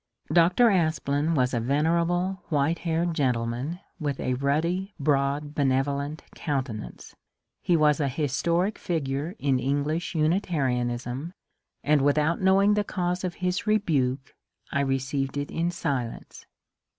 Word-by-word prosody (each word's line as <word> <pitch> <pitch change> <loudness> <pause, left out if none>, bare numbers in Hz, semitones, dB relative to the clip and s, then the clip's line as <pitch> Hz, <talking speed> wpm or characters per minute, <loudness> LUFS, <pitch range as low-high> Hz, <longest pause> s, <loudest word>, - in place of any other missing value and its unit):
Dr. 180 +7 +5
Aspland 160 -3 +1
was 125 0 +2
a 120 - +1
venerable 170 +8 +1
white 155 +1 +1
haired 170 0 0
gen 135 -6 +2
tleman 120 +9 -3 0.2
with 145 -4 -2
a 130 - -1
ruddy, 165 +9 -1
broad, 145 +1 0
benevolent 140 +2 0
countenance; 130 - -4 0.5
he 175 - +2
was 150 -1 +3
a 145 - +1
historic 165 - 0
figure 155 0 -2
in 135 -7 +1
English 145 +7 -1
Unitarianism, 140 -4 -1 0.5
and 150 -1 +3
without 150 +5 +2
know 190 +1 +4
ing 205 +1 +4
the 210 0 +2
cause 180 -2 -2
of 180 -2 -3
his 180 +3 -1
rebuke 140 -11 +1 0.4
I 140 - 0
received 135 0 -1
it 145 0 -3
in 170 +1 0
silence. 140 -9 -4
150 Hz, 130 wpm, -26 LUFS, 135-170 Hz, 0.5 s, Dr